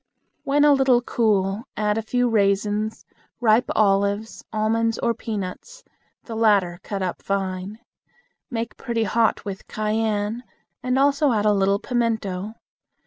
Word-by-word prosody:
When 290 +1 +2
a 295 - +7
little 265 -3 +3
cool, 210 -2 0
add 210 -1 +1
a 225 - -1
few 245 +3 0
raisins, 210 0 0 0.3
ripe 230 0 +3
olives, 200 +1 +1
almonds, 225 +1 0
or 235 - 0
peanuts, 225 - -6 0.4
the 230 - -8
latter 200 -6 +2
cut 195 -1 -4
up 180 - -3
fine. 195 +1 -3 0.7
Make 230 -3 -4
pretty 235 -3 -1
hot 225 +2 +1
with 195 -2 -6
cayenne, 215 +1 -1 0.4
and 255 +1 0
also 280 +1 +3
add 210 -1 0
a 210 - +4
little 195 0 +2
pimento. 220 -4 -2
215 Hz, 135 wpm, -23 LUFS, 200-235 Hz, 0.7 s, a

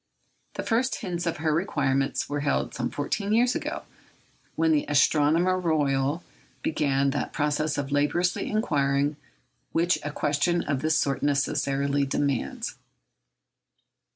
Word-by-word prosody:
The - - -3
first 250 +4 0
hints 175 -5 -3
of 165 - -1
her 155 0 0
requirements 135 -6 0
were 145 0 -2
heard 145 0 0
some - - -2
fourteen 200 +8 -2
years 245 +2 +4
ago, - - -4 0.7
when 160 0 +2
the 150 -2 +2
Astronomer 155 +5 +3
Royal 145 -2 +1 0.4
began 140 -3 +1
that 145 - -3
process 150 +1 0
of 140 0 -3
laborious 150 +5 +1
inquiry 145 -8 0 0.6
which 175 +2 +2
a 150 - -3
question 150 +4 0
of 140 -3 -1
this 155 0 +2
sort 135 -2 0
necessarily 140 0 +1
demands. 140 -2 -2
150 Hz, 125 wpm, -26 LUFS, 140-170 Hz, 0.7 s, years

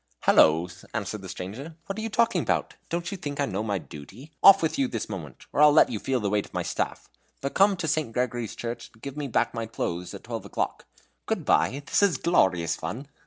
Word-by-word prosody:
"Hallo!" 80 +3 +5 0.3
answered 105 -1 -3
the 95 - -9
stranger. 125 - -7
"What 195 - -4
are 220 - -4
you 225 - -3
talking 230 +2 +2
about? - - -1 0.2
Do 170 +1 -1
you 195 +3 -4
think 145 -4 -5
I 140 - +2
don't - - -6
know - - -1
my 105 -2 -1
duty? 95 - -11
Off 195 -2 +8
with 160 - 0
you 135 - +3
this 115 -3 -4
moment, 85 -10 -8
or - - +2
I'll 150 0 +8
let - - +5
you 105 - -2
feel 130 +3 0
the 100 -3 -1
weight 105 -1 0
of - - -16
my - - 0
staff. - - -3 0.3
But 140 - -3
come 195 0 +4
to 170 -2 -3
St. 155 -5 0
Gregory's 120 -2 -2
Church 120 0 -5
and 110 - -23
give 140 -1 -6
me 145 -1 -3
back 120 - +1
my 115 -1 -3
clothes 90 -5 -4
at - - -10
twelve - - -5
o'clock. - - -3 0.4
Good - - -1
bye. 115 - +2
This - - +2
is 200 -4 +3
glorious 90 - +2
fun!" 115 - -6
125 Hz, 240 wpm, -26 LUFS, 100-155 Hz, 0.4 s, Off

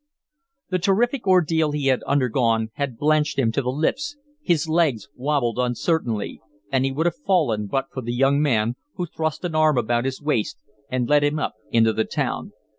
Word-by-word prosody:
The 185 - +1
terrific 220 +6 +1
ordeal 160 -4 +3
he 145 -2 -2
had 130 -2 +3
undergone 115 -5 +1
had 140 -5 -3
blanched 150 +1 +1
him 120 -5 +2
to 125 - 0
the 125 - -2
lips, 165 - -1 0.2
his 170 - +1
legs 155 - +1
wabbled 125 -3 0
uncertainly, 125 -2 -1 0.3
and 130 -1 +2
he 135 - 0
would 155 +5 -1
have 175 - 0
fallen 155 - +1
but 135 +5 -1
for 130 - -4
the 120 0 -4
young 135 +3 +3
man, 120 -4 +1 0.2
who 180 - -2
thrust 160 +1 -3
an 170 - -3
arm 155 -3 +3
about 120 +1 +1
his 135 0 -2
waist 145 -8 -1 0.3
and 130 -2 -1
led 145 +1 +4
him 145 +1 +1
up 150 - -2 0.2
into 115 -1 +3
the 110 - 0
town. - - -3
140 Hz, 190 wpm, -23 LUFS, 120-160 Hz, 0.3 s, led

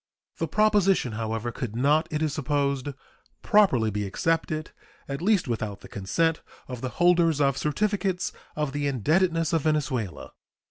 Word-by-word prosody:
The 165 - 0
proposition, 195 - +3
however, 115 +1 -3
could 115 -2 -5
not, 150 +6 +2
it 155 0 -1
is 155 -2 0
supposed, 140 -2 -1 0.6
properly 160 - +4
be 105 0 -2
accepted, 155 +7 -1 0.4
at 140 +2 -4
least 195 -3 +2
without 110 -4 -3
the - - -11
consent 160 - 0 0.3
of 125 -2 -7
the 130 - -2
holders 170 -3 +4
of 140 -2 +3
certificates 190 +5 -1 0.2
of 150 -2 -1
the 145 0 -1
indebtedness 165 - +1
of 165 - +2
Venezuela. 140 - -2
150 Hz, 145 wpm, -26 LUFS, 125-165 Hz, 0.6 s, properly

